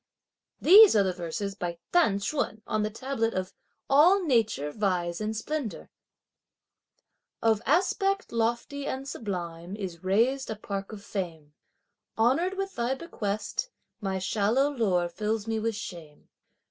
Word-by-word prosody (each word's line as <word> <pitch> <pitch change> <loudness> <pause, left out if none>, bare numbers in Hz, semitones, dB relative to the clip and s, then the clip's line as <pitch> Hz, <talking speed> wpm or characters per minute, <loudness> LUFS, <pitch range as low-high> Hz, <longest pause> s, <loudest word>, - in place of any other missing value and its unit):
These 405 - +9
are 205 - +5
the 190 -1 0
verses 180 +3 -4
by 175 -3 -4 0.2
T'an 320 - +4
Ch'un 215 0 -2
on 215 - -1
the 210 - 0
tablet 230 0 -2
of 185 0 -3 0.3
"All 345 +8 +5
nature 220 - +1
vies 180 -2 -1
in 215 +1 -2
splendour": 280 0 -4 1.5
Of 220 -2 +2
aspect 390 +5 +1
lofty 235 +5 -1
and 265 +1 -4
sublime 175 -6 -5
is 185 -5 -6
raised 235 +8 +2
a 220 - -2
park 200 -1 -5
of 205 -2 -9
fame! 165 -7 -5 0.6
Honoured 305 +12 +2
with 390 0 -3
thy 240 +2 -1
bequest, 235 - -3 0.3
my 195 -3 -2
shallow 220 +9 +1
lore 190 -10 +1
fills 210 +4 -2
me 225 -1 -1
with 225 0 -1
shame. 170 -7 -9
215 Hz, 135 wpm, -28 LUFS, 190-270 Hz, 1.5 s, These